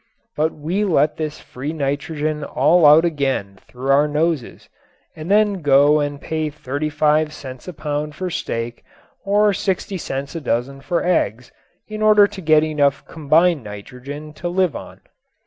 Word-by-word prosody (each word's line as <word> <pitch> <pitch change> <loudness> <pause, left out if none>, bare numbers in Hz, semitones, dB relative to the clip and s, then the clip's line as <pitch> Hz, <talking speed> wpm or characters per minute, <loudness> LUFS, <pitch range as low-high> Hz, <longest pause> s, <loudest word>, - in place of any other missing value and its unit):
But 155 +1 +1
we 170 +7 -2
let 155 -6 +2
this 155 -1 -4
free 140 +5 -6
nitrogen 150 +1 -2
all 150 +4 +4
out 155 +3 +7
again 135 - -2
through 130 +2 -3
our 145 +2 +4
noses 150 -3 -2 0.5
and 160 +2 -8
then 205 -2 +3
go 145 +1 +5
and 145 -1 -2
pay 155 0 -3
35 150 +2 0
cents 130 -3 -10
a 180 - -6
pound 150 0 -4
for 185 +2 -4
steak 115 -5 -4 0.4
or 205 +1 +3
60 190 0 -2
cents 135 -2 -5
a 165 - -5
dozen 135 +1 -2
for 170 +5 -1
eggs 125 - 0 0.4
in 215 0 -6
order 210 -1 +6
to 200 -1 -7
get 155 -2 +4
enough 145 -3 0
combined 160 0 +2
nitrogen 125 +9 -9
to 175 +3 -5
live 180 -2 +1
on. - - -9
150 Hz, 155 wpm, -20 LUFS, 140-170 Hz, 0.5 s, out